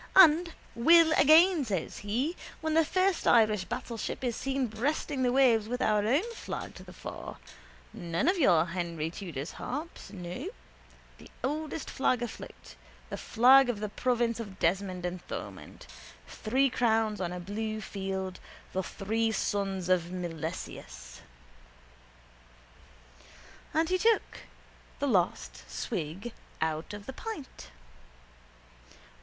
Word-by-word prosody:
And 335 -2 +7 0.2
will 325 +7 +6
again, 320 +2 +6
says 195 -9 -3
he, 245 - -1 0.2
when 315 0 -1
the 325 +1 +5
first 370 +3 +1
Irish 215 -5 +4
battleship 230 +5 -4
is 240 -3 0
seen 270 -1 -1
breasting 260 +5 -2
the 250 -1 +3
waves 245 -5 +4
with 250 +2 -3
our 210 -1 +2
own 280 - +3
flag - - -6
to - - -11
the - - -12
fore, - - -8 0.6
none 170 - -2
of 370 0 +3
your 170 - +5
Henry 170 -2 -3
Tudor's 165 -6 -6
harps, 300 +6 -6
no, 180 -1 -6 0.7
the - - -13
oldest 300 +3 -3
flag 250 -2 +1
afloat, 240 - -8 0.4
the - - -3
flag 255 +3 +6
of 225 -4 -1
the 210 0 -3
province 235 0 0
of 200 -4 -7
Desmond 185 +1 0
and 180 0 -3
Thomond, - - -8 0.4
three 260 +4 +1
crowns 220 -4 +1
on 175 -1 -2
a 180 - -5
blue 215 +4 -3
field, 190 -2 -4 0.3
the 190 - 0
three 220 +4 -1
sons 195 -3 -1
of 180 -2 +2
Milesius. 165 - -6 2.5
And 320 +2 +2
he 370 0 +2
took 455 +2 +2 0.6
the 285 - -1
last 185 -8 0
swig 190 - -4 0.3
out 160 0 -2
of 205 -1 -10
the 265 - -6
pint. 345 - -8
220 Hz, 130 wpm, -30 LUFS, 185-275 Hz, 2.5 s, And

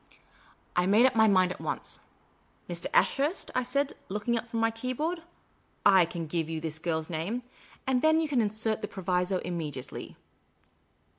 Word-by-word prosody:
I 180 +1 +3
made 215 +5 +6
up 260 - +3
my 220 0 +6
mind 185 -3 +4
at - - -7
once. - - -4 0.4
" - - -37
Mr. - - -2
Ashurst," 345 - +2
I 255 - +2
said, 280 +3 0 0.2
looking 210 +4 -1
up 230 0 -3
from 230 - -2
my 225 0 +3
keyboard, 255 +9 -2 0.4
" - - -39
/can 175 -4 +4
give 160 0 -1
you 160 -1 -2
this 160 0 -3
girl's 160 -1 -1
name; 180 +9 -3 0.4
and 260 -1 +2
then 315 +1 +5
you 320 - +1
can 270 -5 +2
insert 220 +1 -1
the 210 - -2
proviso 185 -1 0
immediately." 155 -7 -5
210 Hz, 170 wpm, -29 LUFS, 175-255 Hz, 0.4 s, made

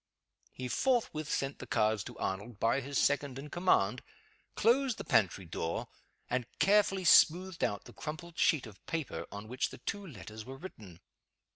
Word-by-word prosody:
He 130 - -5
forthwith 185 - 0
sent 135 0 -1
the - - -8
cards 110 -2 +2
to - - -9
Arnold 100 +3 -4
by 115 +4 +2
his 140 +2 -3
second 140 -2 +1
in 145 +2 -8
command, 125 - +2 0.5
closed 250 +2 +3
the - - -5
pantry 95 -5 +2
door, 80 0 -3 0.4
and 120 -2 -1
carefully 195 -2 +3
smoothed 175 +1 +5
out 100 0 -1
the - - -12
crumpled 160 +2 -7
sheet 155 -7 +3
of 105 -3 -13
paper 135 - -3
on 100 +1 -7
which 125 +3 -1
the - - -10
two 205 0 -4
letters 110 - -9
were 130 +3 -9
written. 105 - -11
135 Hz, 165 wpm, -32 LUFS, 105-170 Hz, 0.5 s, smoothed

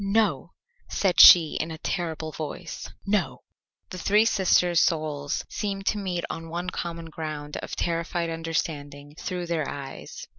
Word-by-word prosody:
"No," 195 -6 +1 0.4
said 190 -3 +1
she 165 -4 +9
in 160 - -3
a 160 - -6
terrible 160 -2 -3
voice. 155 -1 -6 0.2
"No." 205 0 -1 0.5
The 185 - -6
three 210 +4 +4
sisters' 180 -5 +3
souls 155 -4 -1
seemed 195 -2 -4
to 210 - +1
meet 180 -3 -2
on 165 0 -6
one 175 +2 -3
common 170 -1 -5
ground 150 -2 -5
of - - -6
terrified 170 0 -1
understanding 150 -3 -4
through 180 +1 -4
their 165 -4 -2
eyes. 140 -1 -8
170 Hz, 145 wpm, -26 LUFS, 155-180 Hz, 0.5 s, she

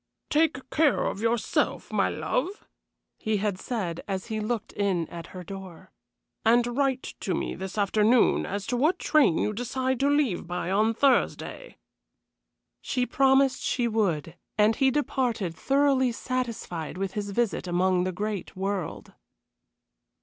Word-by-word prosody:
"Take 300 -4 +2
care 305 -3 +3
of 200 - -2
yourself, 230 0 0
my - - +2
love," 365 +11 -2 0.5
he 215 -1 0
had 200 -2 -1
said, 185 -9 -3
as 190 -2 -3
he 215 - -1
looked 220 0 -3
in 190 -5 0
at 170 -1 -8
her 185 -1 -9
door, 190 -1 -10 0.5
"and 240 +1 +3
write 270 -2 0
to 185 - -1
me - - -2
this 190 +2 -6
afternoon 215 +4 +3
as 200 +1 -4
to 245 - -1
what 305 +8 +3
train 295 - +3
you 210 - 0
decide 255 +3 -1
to 280 - +3
leave 285 - +1
by 180 +1 -3
on 215 +3 +2
Thursday." 280 - +1 1.0
She 250 -1 -1
promised 270 0 +3
she 240 -2 0
would, 185 -9 0 0.2
and 215 +1 +4
he 270 - +4
departed, 250 - -1
thoroughly 270 - +2
satisfied 230 -10 -4
with 195 0 -3
his 205 -1 -3
visit 200 -3 -1
among 180 +1 +2
the 185 - -1
great 205 +1 -4
world. 190 -3 -4
220 Hz, 145 wpm, -27 LUFS, 190-260 Hz, 1.0 s, and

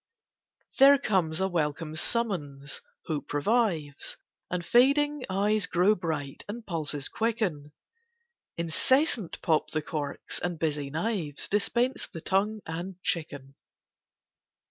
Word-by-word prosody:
There 280 +1 +9
comes 185 - +1
a 190 - +2
welcome 155 -2 -2
summons—hope 155 -6 -3
revives, 155 -3 0 0.3
And 175 -1 -2
fading 280 +5 +4
eyes 205 +2 +1
grow 180 +4 +4
bright, 155 -7 -4
and 225 +2 -6
pulses 155 -6 -1
quicken: 210 -11 -1 0.9
Incessant 215 - +1
pop 160 -2 +2
the 155 -1 -2
corks, 145 -3 -4
and 175 -1 -2
busy 150 -3 -1
knives 160 -2 -2
Dispense 235 +5 0
the 165 - -8
tongue 205 +4 0
and 175 +3 -5
chicken. 145 -5 -2
175 Hz, 105 wpm, -28 LUFS, 150-215 Hz, 0.9 s, There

